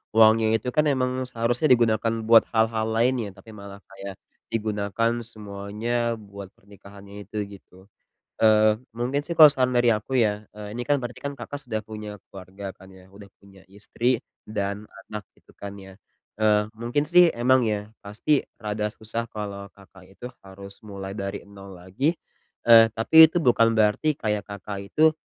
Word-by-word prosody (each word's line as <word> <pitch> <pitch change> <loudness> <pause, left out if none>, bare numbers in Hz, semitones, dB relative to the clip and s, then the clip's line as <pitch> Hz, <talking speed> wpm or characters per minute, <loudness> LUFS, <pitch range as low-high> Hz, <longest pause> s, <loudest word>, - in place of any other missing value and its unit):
uangnya 110 0 +5
itu 115 +3 -2
kan 150 0 +3
emang 130 -2 +1 0.2
seharusnya 120 +5 0
digunakan 115 -1 +1
buat 115 0 +7
hal-hal 110 0 +1
lain 120 +3 +2
ya? - - -7
Tapi 105 +4 -16
malah 100 -1 -11
kayak 100 0 -9 0.4
digunakan 105 +1 -1
semuanya 110 +2 -3
buat 100 -3 -11
pernikahannya 100 0 -14
itu 105 +3 -9 0.2
gitu. 95 -1 -21 0.6
Eee, 110 -1 +4 0.2
mungkin 130 +5 -2
sih 170 - -5
kalo 155 -2 +9
saran 130 -2 0
dari 120 0 +3
aku 110 +4 -2
ya, 105 -1 0
eee, 105 +1 -9
ini 120 - -3
kan 145 -1 +2
berarti 120 0 -7
kan 140 - -2
Kakak 140 +4 -8
sudah 110 -2 -2
punya 105 -1 -9
keluarga 95 +1 -9
kan 95 0 -16
ya? 95 0 -17
Udah 100 0 -14
punya 100 -1 -19
istri 115 +4 0 0.3
dan 100 0 -3 0.2
anak 105 -2 -6
gitu - - -25
kan 100 0 -7
ya? 95 0 -13 0.4
Eee, 105 -1 +2
mungkin 120 +5 -1
sih 175 0 +6
emang 125 +1 +3
ya 105 -1 -2 0.2
pasti 110 +8 0 0.2
rada 105 0 -3
susah 115 +1 -5
kalo 100 -2 -7
Kakak 95 -1 -18
itu 125 +5 -9 0.2
harus 100 +1 -12
mulai 100 0 -7
dari 100 0 -4
nol 100 -1 -12
lagi. 115 - -1 0.5
Eee, 115 -1 +8
tapi 160 +8 +7
itu 175 - 0
bukan 115 -5 +3
berarti 110 +8 +2
kayak 105 -2 -1
Kakak 100 0 -7
itu, 155 +4 +4
110 Hz, 165 wpm, -24 LUFS, 100-120 Hz, 0.6 s, kalo